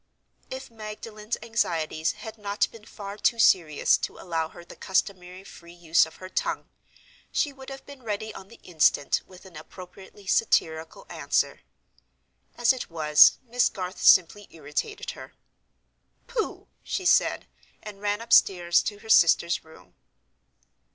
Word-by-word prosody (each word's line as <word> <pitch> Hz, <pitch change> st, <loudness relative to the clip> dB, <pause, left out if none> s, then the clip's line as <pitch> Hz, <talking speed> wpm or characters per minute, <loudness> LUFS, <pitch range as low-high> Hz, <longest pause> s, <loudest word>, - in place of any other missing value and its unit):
If 260 Hz, -1 st, -8 dB
Magdalen's 215 Hz, 0 st, -7 dB
anxieties 165 Hz, -8 st, -1 dB
had 220 Hz, +1 st, -10 dB
not 205 Hz, +1 st, 0 dB
been 225 Hz, -2 st, -14 dB
far 200 Hz, -1 st, -9 dB
too 235 Hz, -, +2 dB
serious 170 Hz, -9 st, +4 dB
to -, -, -5 dB
allow 165 Hz, -3 st, -3 dB
her 170 Hz, -, -13 dB
the -, -, -13 dB
customary 185 Hz, -1 st, -2 dB
free 170 Hz, -3 st, -14 dB
use 165 Hz, -2 st, +3 dB
of 160 Hz, -, -15 dB
her 185 Hz, -, -10 dB
tongue, -, -, -3 dB, 0.6 s
she 290 Hz, -, 0 dB
would 265 Hz, 0 st, -12 dB
have 270 Hz, 0 st, -10 dB
been 280 Hz, -2 st, -13 dB
ready 220 Hz, -1 st, -4 dB
on 195 Hz, -, -11 dB
the 235 Hz, -, -16 dB
instant 155 Hz, -4 st, +2 dB
with 185 Hz, 0 st, -16 dB
an 185 Hz, -3 st, -15 dB
appropriately 185 Hz, +5 st, -13 dB
satirical 160 Hz, -6 st, 0 dB
answer. -, -, -1 dB, 1.0 s
As 240 Hz, +1 st, +4 dB
it 255 Hz, -, -7 dB
was, 155 Hz, -2 st, +5 dB
Miss 245 Hz, 0 st, +1 dB
Garth 185 Hz, -1 st, -6 dB
simply 190 Hz, +3 st, +5 dB
irritated 155 Hz, -, -5 dB
her. -, -, -12 dB, 0.9 s
"Pooh!" 485 Hz, -3 st, -4 dB
she 375 Hz, -, -4 dB
said—and 210 Hz, -, -1 dB
ran 205 Hz, +1 st, -1 dB
upstairs 175 Hz, -6 st, +4 dB
to 205 Hz, -, -4 dB
her 220 Hz, -, -14 dB
sister's 170 Hz, -3 st, +4 dB
room. 160 Hz, 0 st, -18 dB
195 Hz, 140 wpm, -26 LUFS, 170-225 Hz, 1.0 s, was